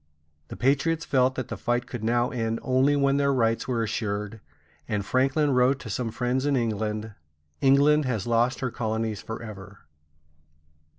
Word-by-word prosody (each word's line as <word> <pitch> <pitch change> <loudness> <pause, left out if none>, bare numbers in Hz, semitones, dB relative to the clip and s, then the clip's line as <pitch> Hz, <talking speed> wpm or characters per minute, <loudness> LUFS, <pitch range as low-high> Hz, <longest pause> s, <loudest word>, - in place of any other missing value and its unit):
The - - -8
patriots 145 +5 +1
felt 130 -1 +2
that 130 - -4
the - - -5
fight 120 +1 -1
could 120 -3 -7
now 120 +2 +1
end 115 -2 -1
only 130 +2 +3
when 140 -1 +2
their 140 0 +2
rights 115 -3 +1
were 120 -3 0
assured; 105 0 -3 0.5
and 105 -2 -2
Franklin 135 +5 +2
wrote 130 +1 +3
to 110 - -7
some 120 +2 -2
friends 125 +3 -1
in 145 - +2
England: 110 -2 -2 0.5
"England 140 +2 +4
has 115 -6 -2
lost 120 +3 +1
her 130 -2 -1
colonies 110 -2 -2
forever." 105 -4 -9
120 Hz, 160 wpm, -26 LUFS, 110-135 Hz, 0.5 s, England